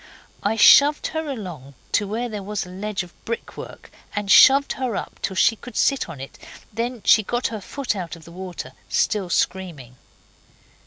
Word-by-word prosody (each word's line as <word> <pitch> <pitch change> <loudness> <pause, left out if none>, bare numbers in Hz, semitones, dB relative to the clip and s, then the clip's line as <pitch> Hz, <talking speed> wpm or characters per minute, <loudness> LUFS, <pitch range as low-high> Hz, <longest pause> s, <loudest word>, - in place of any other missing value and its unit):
I 225 - 0
shoved 285 +6 +6
her 315 -1 -3
along 175 - -7 0.2
to 205 - +1
where 230 +4 -2
there 210 -3 -6
was 205 0 -4
a - - -12
ledge 195 +1 -3
of 175 - -14
brickwork, 230 0 -7 0.2
and 205 -1 -1
shoved 275 +4 +7
her 255 -5 -3
up, - - -6
till 190 - -3
she 225 - +4
could 245 +3 -10
sit 275 -9 +1
on 155 -5 -8
it, 135 - -10 0.3
then 235 +1 -3
she 220 - +6
got 240 +4 -2
her 220 -2 -6
foot 270 +3 -3
out 175 -4 -5
of 165 -2 -15
the 170 - -13
water, 180 0 -7 0.2
still 200 -5 0
screaming. 160 -10 -2
205 Hz, 180 wpm, -22 LUFS, 180-240 Hz, 0.3 s, shoved